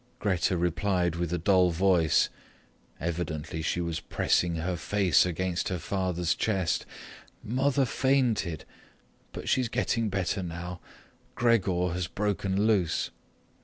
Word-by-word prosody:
Grete 95 -4 +1
replied 90 0 0
with 85 -1 -2
a 90 - 0
dull 90 +1 +4
voice; 85 -2 +3 0.7
evidently 80 -1 -3
she 85 - -1
was 85 -1 -2
pressing 85 0 +1
her 90 +3 -2
face 95 0 +2
into 90 +1 -2
her 90 - -2
father's 90 -2 -1
chest: 95 -6 -1 0.6
"Mother 135 +4 +1
fainted, 120 - +1 0.7
but - - -7
she's 125 -3 +2
getting 115 -1 0
better 95 0 -1
now. 90 0 -6 0.6
Gregor 95 -7 +2
has 90 -1 -2
broken 100 0 -1
loose." 95 -7 +1
90 Hz, 120 wpm, -28 LUFS, 85-100 Hz, 0.7 s, dull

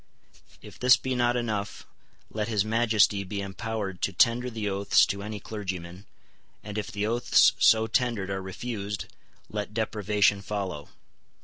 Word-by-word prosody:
If - - -13
this 125 0 +6
be 130 +1 -3
not 120 0 +1
enough, 110 -4 -3 0.5
let 105 -1 -2
his 105 -3 +1
Majesty 110 -3 +2
be 100 +2 -5
empowered 100 -1 -4
to - - 0
tender 120 +5 +2
the 110 -3 -4
oaths 100 0 +3
to 100 0 -4
any 105 +1 -5
clergyman; 95 -3 -6 0.6
and, 105 0 -7
if 105 - -5
the 105 0 -2
oaths 120 +3 +4
so 110 0 +5
tendered 115 -4 -1
are 95 0 -2
refused, 100 +1 -5 0.4
let 105 0 -5
deprivation 105 -2 +1
follow. 95 -7 -4
105 Hz, 145 wpm, -27 LUFS, 100-115 Hz, 0.6 s, this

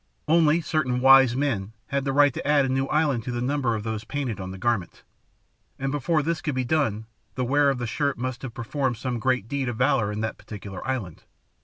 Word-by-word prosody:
Only 160 0 +4
certain 140 -7 0
"wise 135 -1 +7
men" 115 -7 -1 0.2
had 140 0 -1
the 135 - 0
right 145 0 +4
to - - -5
add 145 -2 +4
a - - -2
new 135 +1 0
island 145 -7 +1
to 125 - -3
the 120 - -3
number 130 -2 0
of 105 - -4
those 110 -1 -3
painted 135 -7 -3
on 95 -1 -5
the 95 - -7
garment, 105 -2 -2 0.7
and 135 0 -2
before 145 +2 0
this 165 +1 -1
could 150 -5 -2
be 130 -1 -1
done 120 -7 0 0.3
the 130 - -1
wearer 140 +3 +3
of 135 - 0
the 120 - -3
shirt 140 +5 -1
must 130 +1 -4
have 125 -4 -7
performed 125 +1 -2
some 120 0 -3
great 125 -3 0
deed 135 0 -2
of 120 - -4
valour 125 -5 +2
in 105 +1 -3
that 110 - -3
particular 100 -2 -8
island. 115 - -4
130 Hz, 225 wpm, -25 LUFS, 115-145 Hz, 0.7 s, wise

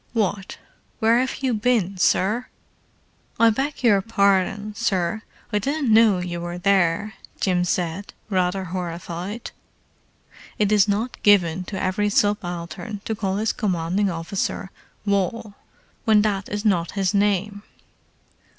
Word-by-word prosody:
"What? 205 -3 -1 0.4
Where 230 +1 +3
have 260 +1 -2
you 260 -2 +1
been, 215 -4 +1
sir?" 210 +7 +2 0.9
"I 230 0 +6
beg 270 +5 -3
your 205 -5 +5
pardon, 200 0 +1
sir—I 210 +1 -2
didn't 275 0 0
know 220 -3 +6
you 175 -1 -4
were 175 0 -5
there," 195 +1 +1 0.3
Jim 180 -2 +1
said, 180 +2 -2 0.2
rather 190 -1 0
horrified. 180 +3 -5 1.1
It 210 -1 +1
is 210 -1 +5
not 215 +5 -2
given 185 -4 +3
to 195 +1 -5
every 195 +2 0
subaltern 195 -1 -1
to 220 - -1
call 195 -3 -2
his 215 +1 0
commanding 190 0 0
officer 180 +3 -3 0.3
"Wal," 200 +2 -1 0.5
when 215 -2 +5
that 200 -2 -1
is 210 +1 -4
not 175 -5 +1
his 195 -1 0
name. 205 0 +1
200 Hz, 125 wpm, -23 LUFS, 180-215 Hz, 1.1 s, I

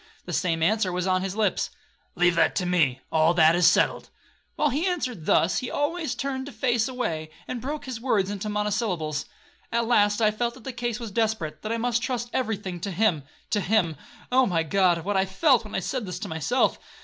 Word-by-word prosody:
The - - -6
same 165 -3 0
answer 210 +1 +2
was 180 0 -2
on 185 -1 +2
his 190 0 -3
lips,—'Leave 180 -4 -1
that 165 -2 +2
to 180 - 0
me,—all 160 0 +2
that 160 -1 +6
is 175 -1 +5
settled.' - - +2 0.5
While 300 - +2
he 305 +8 0
answered 255 - -3
thus, 175 +2 +3
he 255 - -5
always 315 +3 -1
turned 270 -1 -3
his 285 - -10
face 240 -3 +1
away, 165 -12 -3 0.2
and 245 -2 -4
broke 295 +4 -4
his 255 -4 -6
words 205 -6 +1
into 205 +1 -4
monosyllables. 210 -8 -1 0.5
At 235 0 +1
last 205 -3 +3
I 215 -2 +4
felt 235 +2 -2
that 255 - -14
the 265 - -5
case 240 -1 -3
was 230 -3 -6
desperate,—that 215 -4 -2
I 230 - 0
must 235 0 0
trust 245 -1 -3
every 225 -5 0
thing 185 -3 -6
to 200 - -4
him. 180 -6 +1 0.3
To 205 - +2
him! 180 -5 +1 0.4
Oh, 260 0 +4
my 165 -3 +1
God! 175 0 +2
what 205 0 0
I 190 - +3
felt 240 - +3
when 210 - -7
I - - +1
said 250 0 -3
this 180 - -4
to - - -4
myself! 160 - 0
210 Hz, 210 wpm, -25 LUFS, 180-245 Hz, 0.5 s, that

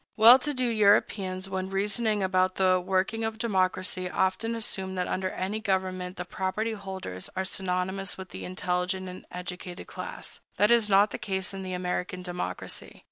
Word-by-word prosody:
Well 230 +4 +10
to 295 +3 -2
do 255 -3 0
Europeans, 200 -4 +3
when 190 0 -3
reasoning 205 +2 +1
about 185 0 +2
the 185 -1 +4
working 190 +4 +1
of 220 0 -2
democracy, 185 -4 0
often 190 +6 0
assume 190 -4 -4
that 180 -1 -1
under 185 0 -1
any 195 +4 -2
government 185 -3 -1
the 180 - -4
property 190 +5 -1
holders 190 - -6
are 190 0 0
synonymous 190 +1 -2
with 190 -1 -8
the - - -7
intelligent 185 +1 -1
and 180 0 -9
educated 180 0 -6
class. - - -7 0.2
That 210 +2 +5
is 230 -3 +5
not 200 +1 +5
the - - -4
case 190 0 -1
in 195 - -5
the 185 -1 -4
American 180 0 -2
democracy. 175 - -5
190 Hz, 170 wpm, -28 LUFS, 185-205 Hz, 0.2 s, Well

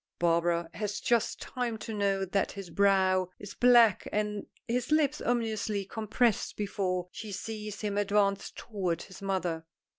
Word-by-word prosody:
Barbara 170 0 +2
has 205 +3 -3
just 235 -2 +1
time 245 -3 -3
to 225 +1 -6
note 195 -2 0
that 195 - +1
his 195 -4 -8
brow 190 -1 +3
is 205 0 -9
black 240 -4 +5
and 210 -1 -2 0.2
his 245 +3 -1
lips 305 -3 +3
ominously 220 -4 0
compressed 220 +2 0
before 185 -3 -1
she 215 -2 -7
sees 210 +1 -5
him 205 -1 -1
advance 200 -1 +2
toward 185 -7 -3
his 190 -1 -12
mother. 180 -4 -1
205 Hz, 145 wpm, -30 LUFS, 190-220 Hz, 0.2 s, black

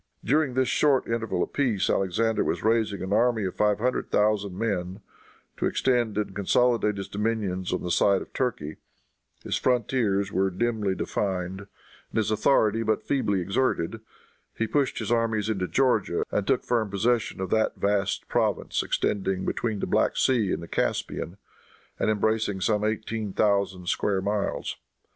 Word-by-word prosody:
During 140 +1 +1
this 130 -1 +2
short 140 0 +3
interval 115 -1 -1
of - - -7
peace 120 -9 +1
Alexander 110 +4 +1
was - - -2
raising 110 -4 +1
an 95 +1 -2
army 120 -1 +2
of 95 - -3
five 105 -1 +2
hundred 125 +4 -1
thousand 105 -3 +1
men, 95 -3 -2 0.6
to - - 0
extend 120 -5 +1
and 105 -2 -2
consolidate 105 +1 +2
his 100 - -5
dominions 100 -4 -2
on 90 - -2
the 90 - -2
side 100 +2 +3
of - - -19
Turkey. 80 - -2 0.7
His - - -1
frontiers 110 -5 +1
there 95 - 0
were 95 - +2
dimly 105 0 -1
defined, 95 0 -3 0.4
and - - -6
his 110 -1 +1
authority 110 0 +3
but 110 -1 0
feebly 110 -9 0
exerted. 95 0 0 0.6
He 115 - +1
pushed 140 +4 0
his - - -3
armies 110 -2 +1
into 95 -3 -1
Georgia 115 -9 +1
and 105 - -1
took 135 -2 +2
firm 115 -4 0
possession 115 +3 0
of 95 -1 -4
that 110 0 +2
vast 100 0 0
province - - 0
extending 95 -2 -1
between 110 -4 -2
the - - 0
Black - - +1
Sea 115 -7 +2
and - - -2
the - - -8
Caspian, 85 +2 -2 0.6
and - - +1
embracing 110 -1 0
some 105 +2 +1
eighteen 110 -1 -2
thousand 100 -3 +1
square 100 0 +1
miles. 100 +1 -2
105 Hz, 160 wpm, -26 LUFS, 95-115 Hz, 0.7 s, short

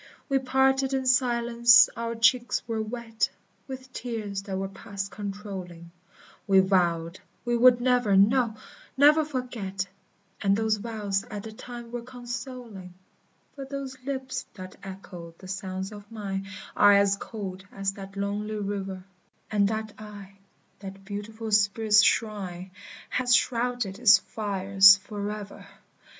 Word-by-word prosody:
We 275 -1 +3
parted 265 +1 +2
in 265 -1 -2
silence, 235 -2 +5
our 230 0 -3
cheeks 240 +1 +2
were 225 -1 -2
wet 225 0 -2 0.4
With 260 -1 -7
the 260 0 -21
tears 215 -5 -4
that 195 -1 -5
were 195 0 -2
past 195 0 -7
controlling; 195 -5 -7 0.6
We 195 -1 +6
vowed 175 -3 +1 0.3
we 240 0 +1
would 245 +1 +6
never, 245 -5 +3
no, 225 +3 +3 0.4
never 300 +3 +6
forget, 240 -10 -4 0.6
And 200 -1 +2
those 220 -1 +1
vows 205 -3 -2
at 205 -2 -7
the 220 - -8
time 240 +1 -10
were 240 0 -4
consoling; 240 -6 -8 0.6
But 275 -1 -8
those 275 -1 -5
lips 265 -1 -4
that 185 -1 -9
echoed 180 -3 -10
the 185 - -12
sounds 190 0 -5
of 205 0 -12
mine 195 -3 -4 0.3
Are 205 0 +7
as 200 0 +4
cold 195 -3 -7
as 195 0 -2
that 195 0 -10
lonely 205 +2 -3
river; 195 -2 -4 0.5
And 205 -2 +3
that 220 0 -3
eye, 200 -2 -11 0.4
that 195 0 -10
beautiful 215 +2 -6
spirit's 210 +1 +4
shrine, 190 -5 -1 0.4
Has 250 -1 +3
shrouded 240 -5 0
its 235 -3 +8
fires 195 -1 +5
forever. 205 0 -7
210 Hz, 135 wpm, -27 LUFS, 195-240 Hz, 0.6 s, its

